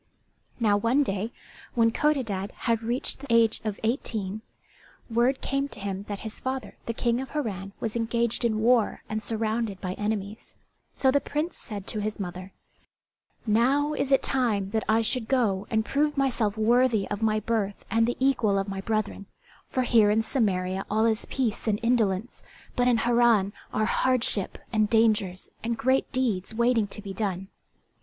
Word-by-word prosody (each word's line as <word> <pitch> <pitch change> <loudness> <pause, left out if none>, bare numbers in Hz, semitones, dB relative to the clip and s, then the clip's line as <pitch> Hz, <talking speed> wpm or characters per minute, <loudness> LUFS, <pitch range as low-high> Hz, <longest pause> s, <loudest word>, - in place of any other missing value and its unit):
Now 210 -3 +3
one 235 +7 +3
day, 205 -1 -2 0.4
when 230 -1 +4
Codadad 225 -10 0
had 230 -2 +1
reached 240 +4 -1
the 280 - -9
age 230 -1 +4
of 215 -2 -3
eighteen, 220 -3 -2 0.7
word 240 +4 +2
came 275 +1 -1
to 280 - -9
him 195 0 -4
that 205 -1 -5
his 220 -1 -6
father 260 0 -4
the 230 - -2
King 235 +1 +1
of 265 - -7
Harran 200 -9 -4
was 220 -1 -3
engaged 235 0 0
in 220 -2 +1
war 235 -1 +2
and 215 0 -3
surrounded 220 -1 -2
by 185 -1 -3
enemies; 210 +1 -4 0.4
so 265 - +3
the 285 +1 +2
Prince 305 +4 -2
said 205 -5 -7
to 215 - -3
his 215 +1 -3
mother, 185 0 -6 0.9
"Now 265 +7 +2
is 280 -2 -2
it 270 - +4
time 215 -7 0
that 220 0 0
I 225 +1 +4
should 225 0 -1
go 215 -7 +1
and 220 -2 +1
prove 295 +3 0
myself 235 -6 +1
worthy 230 -1 +3
of 205 +1 -3
my 215 -1 +2
birth 210 -2 -2
and 225 0 +3
the 245 - -1
equal 245 -7 +2
of 195 +1 -1
my 195 -1 -4
brethren; 215 -1 -2 0.4
for 255 - 0
here 225 -4 +5
in 220 +2 +2
Samaria 190 -5 0
all 220 +2 +2
is 225 -1 0
peace 240 -4 -2
and 210 -1 +1
indolence, 225 -2 +1 0.3
but 245 -1 +2
in 245 -2 +4
Harran 235 -4 +3 0.2
are 215 - +1
hardship 235 -4 +1 0.2
and 215 -1 +2
dangers, 215 -5 +2
and 230 0 -1
great 260 +3 +1
deeds 220 -6 -1
waiting 235 -2 +2
to 210 +1 -4
be 195 -2 -6
done." 195 -2 -3
225 Hz, 175 wpm, -27 LUFS, 205-245 Hz, 0.9 s, here